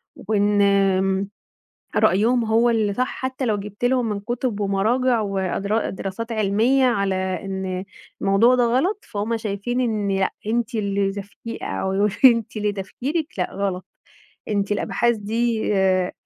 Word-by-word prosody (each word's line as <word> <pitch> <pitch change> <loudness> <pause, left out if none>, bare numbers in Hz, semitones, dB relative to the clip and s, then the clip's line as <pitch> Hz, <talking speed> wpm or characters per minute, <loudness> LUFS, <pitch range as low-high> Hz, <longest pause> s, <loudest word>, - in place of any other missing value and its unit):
وإن 205 0 +1
آمم 195 -1 +2 0.7
رأيهم 230 +5 +3
هو 225 +2 +3
اللي 220 -3 +1
صح 255 +5 0
حتى 260 0 -4
لو 215 -3 +1
جيبت 205 +3 -5
لهم 245 -2 +2
من 205 -1 -2
كُتب 240 0 -2
ومراجع 225 +5 +1
وادرا 200 +2 -1
دراسات 195 +5 -5
علمية 220 +6 +2
على 200 -6 +1
إن 190 0 -3 0.4
الموضوع 210 +6 +4
ده 245 -1 +3
غلط، 285 - +1
فهُم 215 +2 -2
شايفين 220 +3 -2
إن 210 -5 0
لأ 190 - +1 0.2
أنتِ 235 +1 -1
اللي 200 -2 0
زفتي 205 +3 -8
أو 190 0 -2
يقولوا 205 +2 +2 0.2
لي - - +12
أنتِ 230 -1 -3
اللي 210 -1 0
تفكيرِك 270 - -3
لأ 180 - -1
غلط. 190 -2 -2 0.6
أنتِ 205 -1 0
الأبحاث 235 +3 +1
دي، 220 +1 -1
آآ 185 -1 +2
210 Hz, 150 wpm, -22 LUFS, 195-235 Hz, 0.7 s, لي